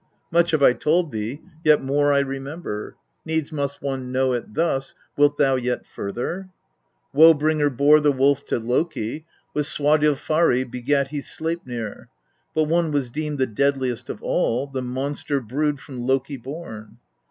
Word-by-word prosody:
7. -, -, -43 dB
Much 170 Hz, +1 st, +3 dB
have 155 Hz, -4 st, +2 dB
I 125 Hz, -, +7 dB
told 160 Hz, +3 st, +1 dB
thee, 110 Hz, +6 st, -4 dB, 0.2 s
yet 150 Hz, -2 st, +5 dB
more 145 Hz, +2 st, +2 dB
I 140 Hz, 0 st, +4 dB
remember; 135 Hz, -4 st, -5 dB, 0.3 s
needs 160 Hz, -1 st, -2 dB
must 140 Hz, -2 st, -3 dB
one 135 Hz, -2 st, -3 dB
know 130 Hz, 0 st, +1 dB
it 120 Hz, -3 st, -5 dB
thus, 135 Hz, -5 st, 0 dB, 0.2 s
wilt 145 Hz, 0 st, +3 dB
thou 135 Hz, -2 st, +3 dB
yet 125 Hz, 0 st, -2 dB
further? 145 Hz, -, -5 dB, 0.6 s
8. -, -, -13 dB
Woe 165 Hz, +1 st, +10 dB
bringer 150 Hz, 0 st, +2 dB
bore 145 Hz, +3 st, +5 dB
the 150 Hz, -1 st, +3 dB
wolf 135 Hz, 0 st, +2 dB
to -, -, 0 dB
Loki, 130 Hz, +3 st, -2 dB, 0.3 s
with 150 Hz, -1 st, 0 dB
Swadilfari 150 Hz, -1 st, +2 dB
begat 130 Hz, +3 st, -1 dB
he 150 Hz, 0 st, -3 dB
Sleiphir. 130 Hz, -10 st, -5 dB, 0.5 s
But 155 Hz, -, +3 dB
one 165 Hz, +1 st, +1 dB
was 140 Hz, -4 st, -1 dB
deemed 150 Hz, +1 st, -3 dB
the 130 Hz, -, +2 dB
deadliest 130 Hz, 0 st, -1 dB
of -, -, -6 dB
all 125 Hz, +4 st, +1 dB
the 135 Hz, -2 st, -5 dB
monster 135 Hz, +3 st, -2 dB
brood 140 Hz, +4 st, -1 dB
from 130 Hz, -4 st, -8 dB
Loki 135 Hz, +1 st, 0 dB
born. 120 Hz, -5 st, -9 dB
140 Hz, 165 wpm, -23 LUFS, 130-150 Hz, 0.6 s, Woe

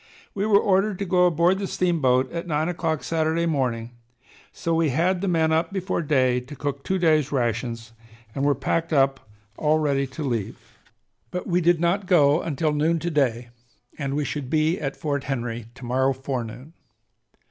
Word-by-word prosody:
We 200 Hz, +1 st, -1 dB
were 205 Hz, -2 st, +5 dB
ordered 195 Hz, 0 st, +2 dB
to 200 Hz, -, -3 dB
go 180 Hz, -1 st, +4 dB
aboard 175 Hz, +3 st, +2 dB
the 200 Hz, -, -2 dB
steamboat 135 Hz, -10 st, +1 dB
at 170 Hz, +1 st, -5 dB
nine 155 Hz, 0 st, 0 dB
o'clock 165 Hz, -3 st, -2 dB
Saturday 165 Hz, +1 st, 0 dB
morning, 125 Hz, -7 st, -1 dB, 0.6 s
so 165 Hz, -, -2 dB
we 165 Hz, -1 st, +2 dB
had 175 Hz, +7 st, +1 dB
the 200 Hz, -, -1 dB
men 160 Hz, -3 st, +2 dB
up 160 Hz, +3 st, +1 dB
before 190 Hz, -2 st, -2 dB
day 130 Hz, -5 st, +2 dB
to 130 Hz, +4 st, -10 dB
cook 140 Hz, 0 st, -4 dB
two 190 Hz, -, 0 dB
days' 155 Hz, -5 st, +2 dB
rations 115 Hz, -3 st, -2 dB, 0.4 s
and 135 Hz, -, -2 dB
were 145 Hz, 0 st, +3 dB
packed 165 Hz, +5 st, -1 dB
up 135 Hz, -2 st, +3 dB, 0.4 s
all 155 Hz, 0 st, +2 dB
ready 140 Hz, -3 st, 0 dB
to 135 Hz, +4 st, -7 dB
leave. 115 Hz, -7 st, -2 dB, 0.7 s
But 180 Hz, -, -4 dB
we 180 Hz, 0 st, +1 dB
did 175 Hz, 0 st, +3 dB
not 180 Hz, +3 st, 0 dB
go 150 Hz, -3 st, +4 dB
until 155 Hz, -1 st, -1 dB
noon 155 Hz, +3 st, +1 dB
to 170 Hz, +2 st, -3 dB
day 125 Hz, -5 st, 0 dB, 0.5 s
and 140 Hz, -2 st, -3 dB
we 150 Hz, 0 st, -1 dB
should 140 Hz, -3 st, -4 dB
be 155 Hz, +3 st, +1 dB
at 135 Hz, -2 st, -4 dB
Fort 140 Hz, -2 st, -2 dB
Henry 120 Hz, -4 st, -3 dB
to 130 Hz, -, -10 dB
morrow 130 Hz, +2 st, +1 dB
forenoon. 130 Hz, +1 st, -6 dB
150 Hz, 180 wpm, -24 LUFS, 135-170 Hz, 0.7 s, were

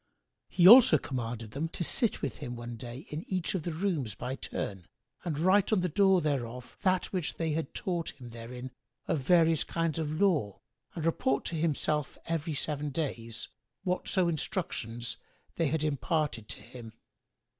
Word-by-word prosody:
He 180 Hz, -1 st, +5 dB
also 250 Hz, +3 st, +10 dB
commanded 115 Hz, -4 st, -4 dB
them 145 Hz, +7 st, -2 dB
to 175 Hz, -, -3 dB
sit 225 Hz, +6 st, +1 dB
with 135 Hz, -6 st, -3 dB
him 125 Hz, -4 st, -5 dB
one 120 Hz, 0 st, -6 dB
day 120 Hz, +4 st, -8 dB
in 155 Hz, +3 st, -4 dB
each 185 Hz, -2 st, 0 dB
of 185 Hz, -, -1 dB
the 170 Hz, -, -3 dB
rooms 160 Hz, -, -1 dB
by 125 Hz, +4 st, -4 dB
turn 95 Hz, -8 st, -5 dB, 0.4 s
and 160 Hz, -4 st, -2 dB
write 190 Hz, +6 st, +4 dB
on 210 Hz, -4 st, +3 dB
the 180 Hz, -, 0 dB
door 190 Hz, +2 st, +4 dB
thereof 125 Hz, -5 st, -3 dB
that 185 Hz, -1 st, +1 dB
which 180 Hz, -5 st, -1 dB
they 165 Hz, -1 st, -1 dB
had 155 Hz, -2 st, -3 dB
taught 175 Hz, -3 st, -2 dB
him 120 Hz, -2 st, -9 dB
therein 125 Hz, +2 st, -7 dB, 0.4 s
of 155 Hz, -, +1 dB
various 165 Hz, +2 st, +4 dB
kinds 165 Hz, -1 st, -1 dB
of 155 Hz, 0 st, -2 dB
lore 155 Hz, -, +2 dB, 0.4 s
and 160 Hz, -, -3 dB
report 140 Hz, -4 st, +1 dB
to 170 Hz, -, -3 dB
himself, 150 Hz, -2 st, 0 dB
every 160 Hz, -1 st, -2 dB
seven 150 Hz, 0 st, -1 dB
days, 120 Hz, -6 st, -4 dB, 0.3 s
whatso 180 Hz, 0 st, +1 dB
instructions 125 Hz, -, -2 dB, 0.4 s
they 165 Hz, -, +2 dB
had 155 Hz, +2 st, 0 dB
imparted 145 Hz, -5 st, 0 dB
to -, -, -7 dB
him. 115 Hz, -3 st, -10 dB
150 Hz, 165 wpm, -30 LUFS, 125-170 Hz, 0.4 s, also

